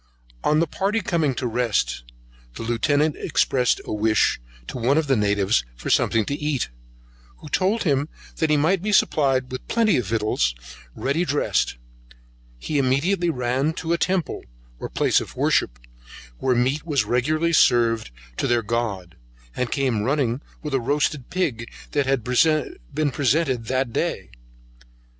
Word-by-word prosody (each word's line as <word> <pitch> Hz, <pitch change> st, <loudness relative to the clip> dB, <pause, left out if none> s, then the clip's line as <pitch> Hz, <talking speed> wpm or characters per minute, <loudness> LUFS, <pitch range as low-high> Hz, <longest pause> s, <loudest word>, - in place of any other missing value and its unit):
On 150 Hz, +1 st, +3 dB
the 165 Hz, -, +3 dB
party 200 Hz, +7 st, -1 dB
coming 165 Hz, -, 0 dB
to 125 Hz, -, -3 dB
a -, -, +1 dB
rest, 120 Hz, -, 0 dB, 0.5 s
the -, -, -6 dB
Lieutenant 145 Hz, +6 st, +1 dB
expressed 125 Hz, -2 st, +1 dB
a -, -, -4 dB
wish 110 Hz, -, +2 dB, 0.2 s
to 125 Hz, -, -6 dB
one 130 Hz, +5 st, +2 dB
of 160 Hz, -, +2 dB
the 135 Hz, -2 st, +2 dB
natives 100 Hz, -, +2 dB
for -, -, -4 dB
something 110 Hz, -2 st, +2 dB
to -, -, -3 dB
eat, 150 Hz, -, -2 dB, 0.7 s
who -, -, -11 dB
told 195 Hz, +8 st, +1 dB
him 145 Hz, -3 st, +1 dB, 0.3 s
he 155 Hz, -2 st, +2 dB
might 165 Hz, +5 st, +2 dB
be 210 Hz, +2 st, -1 dB
supplied 135 Hz, -9 st, +2 dB
with 130 Hz, -, -7 dB
plenty 220 Hz, -8 st, +2 dB
of 120 Hz, -6 st, -2 dB
victuals 110 Hz, -, 0 dB, 0.4 s
ready 140 Hz, +6 st, 0 dB
dressed; 145 Hz, -, 0 dB, 0.8 s
he 145 Hz, -, -2 dB
immediately 165 Hz, +8 st, +1 dB
ran 130 Hz, +2 st, 0 dB
to 165 Hz, 0 st, -2 dB
a -, -, +2 dB
temple, 185 Hz, -4 st, -1 dB, 0.4 s
or -, -, -5 dB
place -, -, +2 dB
of -, -, -9 dB
worship, -, -, +1 dB, 0.6 s
where 130 Hz, -1 st, +1 dB
meat 130 Hz, +5 st, +1 dB
was 140 Hz, -9 st, 0 dB
regularly 155 Hz, +9 st, +1 dB
served 115 Hz, -, +3 dB, 0.3 s
to -, -, 0 dB
their 120 Hz, -1 st, +2 dB
god, 105 Hz, -6 st, -3 dB, 0.4 s
and 125 Hz, -, -1 dB
came 130 Hz, -6 st, 0 dB
running 130 Hz, +1 st, 0 dB, 0.2 s
with 150 Hz, -2 st, -4 dB
a 135 Hz, -, +1 dB
roasted 145 Hz, 0 st, -1 dB
pig, 135 Hz, -11 st, -2 dB, 0.2 s
that 145 Hz, -2 st, 0 dB
had 135 Hz, -3 st, +1 dB, 0.7 s
been 150 Hz, -1 st, +1 dB
presented 130 Hz, -2 st, +1 dB
that 130 Hz, -1 st, -1 dB
day. -, -, -2 dB
135 Hz, 155 wpm, -23 LUFS, 120-155 Hz, 0.8 s, On